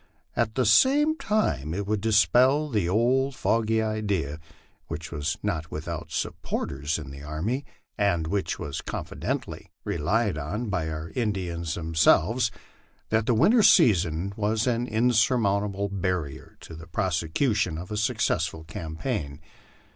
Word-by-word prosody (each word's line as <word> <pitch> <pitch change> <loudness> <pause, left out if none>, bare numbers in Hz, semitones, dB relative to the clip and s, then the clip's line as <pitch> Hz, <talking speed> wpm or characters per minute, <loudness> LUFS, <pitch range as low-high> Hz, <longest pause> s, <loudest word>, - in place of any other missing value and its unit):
At 110 -2 0
the 130 - +2
same 280 - +5
time 80 - -1
it 100 +1 -2
would 105 0 -1
dispel 125 +7 +4
the 105 -9 0
old 130 +6 +2
fogy 110 -2 +1
idea, 100 -9 -2 0.5
which 80 +1 -6
was 75 0 -2
not 80 0 -2
without 80 +1 -5
supporters 70 +3 -3
in 75 -4 -8
the 70 0 -9
army, 90 - -3 0.3
and 85 -6 +2
which 95 +4 -1
was 70 - -5
confidently - - -4
relied 100 +2 0
on 105 +10 -3
by 90 -5 -1
the 80 0 -5
Indians 90 -8 -2
themselves, 85 +8 +3 0.6
that 110 0 +1
the 120 - +3
winter 210 - +5
season 95 - +4
was 110 +1 0
an 120 -1 0
insurmountable 105 -3 +2
barrier 90 -7 -3
to - - -11
the 80 0 -11
prosecution 85 - 0
of 90 +4 -8
a - - -2
success 105 0 +1
ful 80 - -9
campaign. 80 - -4
100 Hz, 135 wpm, -26 LUFS, 80-115 Hz, 0.6 s, same